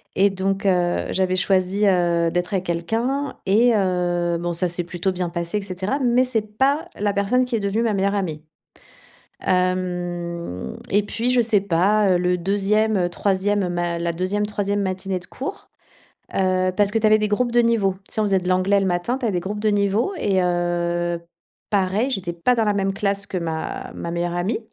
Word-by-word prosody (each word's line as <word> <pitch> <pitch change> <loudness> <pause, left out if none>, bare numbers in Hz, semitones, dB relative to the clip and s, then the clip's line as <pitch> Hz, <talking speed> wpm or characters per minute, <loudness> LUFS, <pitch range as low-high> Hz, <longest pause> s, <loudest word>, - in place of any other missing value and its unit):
et 200 +2 +4
donc 195 +1 -1
heu, 175 -2 +1
j'avais 185 -1 +1
choisie, 190 +2 +2
heu, 170 -2 +2
d'être 175 +3 -2
avec 185 -1 0
quelqu'un 230 +12 -1
et 230 +5 +4
heu, 175 -3 0
bon, 175 0 -2
ça 180 +2 0
s'est 175 +1 -3
plutôt 175 +2 -2
bien 180 -1 -2
passé, 170 +3 -2
et - - -2
cetera. 190 +6 -2
Mais 250 0 +3
c'est 245 -4 -1 0.2
pas 280 +4 +2
la 205 -1 +1
personne 205 +6 +2
qui 250 -2 -2
est - - +1
devenue 200 +2 0
ma 230 -2 +1
meilleure 200 0 +1
amie. 165 -7 -2 1.0
Hem 175 - -2
et 205 +1 +4
puis 230 +4 -1
je 250 -1 +4
sais 220 -3 +2
pas, 200 +2 +2
heu, 180 - +4
le 180 0 +1
2e, 200 +1 +1
3e, 195 +1 0
ma 175 -1 -1
la 170 0 -1
2e, 185 +4 -1
3e 205 -1 -1
matinée 190 0 -2
de 180 - -9
cours, 395 - -7 0.6
heu 185 -1 +1
parce 205 0 +2
que 225 - +1
tu 220 - +1
avais 215 0 +5
des 210 0 0
groupes 235 +3 0
de 240 - +5
niveau. 225 -5 +2 0.2
Tu - - -6
sais, - - -1
on 215 - +2
faisait 195 -2 +2
de 180 0 -4
l'anglais 185 +2 +3
le - - 0
matin, 180 +7 0
tu 260 - -4
avais 220 - +1
des 180 - +1
groupes 205 +4 -5
de 215 - +2
niveau 205 - +1
et 195 - +1
heu, 175 -1 0 0.5
pareil, 200 +5 +1
j'étais 195 -8 -3
pas 170 +9 +2
dans 225 -2 +1
la 210 - +2
même 195 -1 0
classe 200 -1 -1
que 185 - -3
ma 160 -2 -4
ma 170 - -5
meilleure 175 0 -2
amie 195 +6 -1
195 Hz, 205 wpm, -22 LUFS, 175-210 Hz, 1.0 s, avais